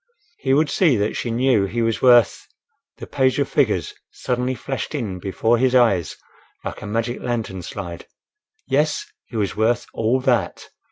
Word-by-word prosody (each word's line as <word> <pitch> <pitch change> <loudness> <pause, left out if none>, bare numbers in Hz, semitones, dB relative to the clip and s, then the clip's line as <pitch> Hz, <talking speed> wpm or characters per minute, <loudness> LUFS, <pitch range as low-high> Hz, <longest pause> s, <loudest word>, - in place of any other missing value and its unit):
He 135 0 +2
would 150 +1 +2
see 165 -9 +3
that 105 +1 -1
she 120 - -3
knew 120 -3 +2
he 115 +4 -2
was 115 -1 -1
worth—the 120 -3 +1
page 130 -2 +1
of 140 -1 +1
figures 105 - 0 0.2
suddenly 125 +1 -2
flashed 135 +6 -5
in 105 -10 -3
before 110 +5 +1
his 130 0 +2
eyes 100 -9 +3 0.5
like - - -5
a 110 - -7
magic 115 +3 -2
lantern 115 -6 -3
slide. 85 -1 -7 0.6
Yes, 150 +3 +1 0.2
he 115 - -7
was 100 -3 -1
worth 115 +2 +1
all 115 +4 +1
that! 125 -3 0
120 Hz, 160 wpm, -21 LUFS, 105-130 Hz, 0.6 s, see